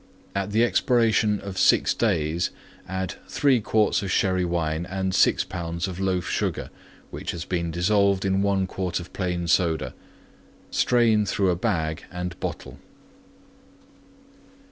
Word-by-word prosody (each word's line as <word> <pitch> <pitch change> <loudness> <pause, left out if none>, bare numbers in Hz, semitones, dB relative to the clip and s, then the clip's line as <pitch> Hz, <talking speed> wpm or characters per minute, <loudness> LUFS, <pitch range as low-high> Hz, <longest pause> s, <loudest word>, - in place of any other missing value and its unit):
At 100 0 -2
the 110 +3 +3
expiration 115 -4 +2
of 95 -2 -5
6 - - +4
days 80 +2 0 0.4
add 95 -1 -3
3 135 -5 +2
quarts 105 0 +2
of 100 - -4
Sherry 95 -1 +2
wine 85 -1 -1
and 95 0 -2
6 - - +4
pounds 85 0 -4
of 95 -1 -6
Loaf 95 -2 0
Sugar, - - -2 0.4
which - - -6
has 85 -1 -4
been 85 -2 -2
dissolved 100 +3 +2
in 95 0 +1
1 100 -1 +1
quart 95 -1 -3
of 85 - -10
plain 90 -2 -2
Soda. 80 -7 +1 0.8
Strain 115 -4 +3
through 95 -2 +1
a - - +1
bag 80 -6 -2
and 90 -1 -4
bottle. 70 +1 -6
95 Hz, 140 wpm, -25 LUFS, 85-100 Hz, 0.8 s, 6